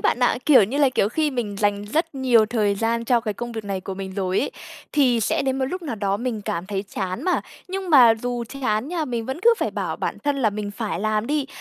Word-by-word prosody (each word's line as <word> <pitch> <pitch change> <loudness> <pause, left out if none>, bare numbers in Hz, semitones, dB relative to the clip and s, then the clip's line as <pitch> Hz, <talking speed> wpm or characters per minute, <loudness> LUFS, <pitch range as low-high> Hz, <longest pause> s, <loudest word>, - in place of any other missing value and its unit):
bạn - - +1
ạ, 245 - +3
kiểu 275 -8 +7
như 265 +8 -3
là, 280 -2 +5
kiểu, 210 -5 +1
khi 305 +4 0
mình 225 -6 -3
dành 205 0 0
rất 320 +8 -1
nhiều 245 -5 +4
thời 210 -3 +1
gian 230 +2 -1
cho 240 0 +3
cái 215 -3 -3
công 240 +2 -5
việc 220 -2 -5
này 195 -2 -3
của 195 - -6
mình 190 0 -6
rồi 190 -1 0
ấy, 280 - -2 0.4
thì 255 -6 +3
sẽ - - +1
đến 265 0 -1
một 260 - +1
lúc 360 +6 -4
nào 255 -8 -4
đó 200 -1 0
mình 230 -2 -3
cảm 170 0 -3
thấy 200 -1 -2
chán 190 +5 -4
mà, 365 - +2 0.3
nhưng 380 -1 -4
mà 245 -6 +8
dù 240 +1 -3
chán 250 -1 -2
nha, 335 -3 -1
mình 235 -4 -3
vẫn 265 +6 -4
cứ 470 0 +6
phải - - -1
bảo - - -3
bản - - -3
thân 290 -1 +1
là 230 -6 +2
mình 205 0 -4
phải 205 -5 -4
làm 215 +1 0
đi. 295 -2 0
235 Hz, 265 wpm, -23 LUFS, 205-270 Hz, 0.4 s, mà